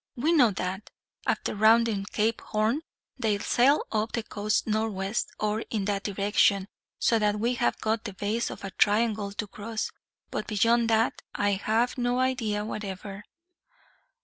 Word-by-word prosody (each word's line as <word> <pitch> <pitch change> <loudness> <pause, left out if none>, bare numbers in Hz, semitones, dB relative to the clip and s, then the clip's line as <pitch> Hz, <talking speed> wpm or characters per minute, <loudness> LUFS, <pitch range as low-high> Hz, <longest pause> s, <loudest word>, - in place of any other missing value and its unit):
We 285 +6 +1
know 275 -9 +6
that, 190 0 -4 0.4
after - - 0
rounding 220 -1 +4
Cape 220 +2 0
Horn, 220 +7 0 0.4
they 220 -4 +1
sail 255 +7 +3
up 220 +1 -1
the 230 - -1
coast 210 0 -1
northwest, 215 -1 -1
or 215 0 0
in 210 -4 -1
that 200 -1 0
direction, 200 -1 +2 0.3
so 230 - +2
that 210 0 +1
we 235 +3 +1
have 240 -1 0
got 220 +1 -1
the 205 - -5
base 210 +5 -1
of - - -9
a 195 - -5
triangle 210 0 +2
to 205 - -3
cross; 215 +2 -4 0.4
but 210 - -3
beyond 230 +2 +3
that, 225 +1 +2
I 205 0 +2
have 220 +6 0
no 245 0 +1
idea 230 -5 0
whatever. 200 -1 -6
215 Hz, 155 wpm, -27 LUFS, 205-230 Hz, 0.4 s, know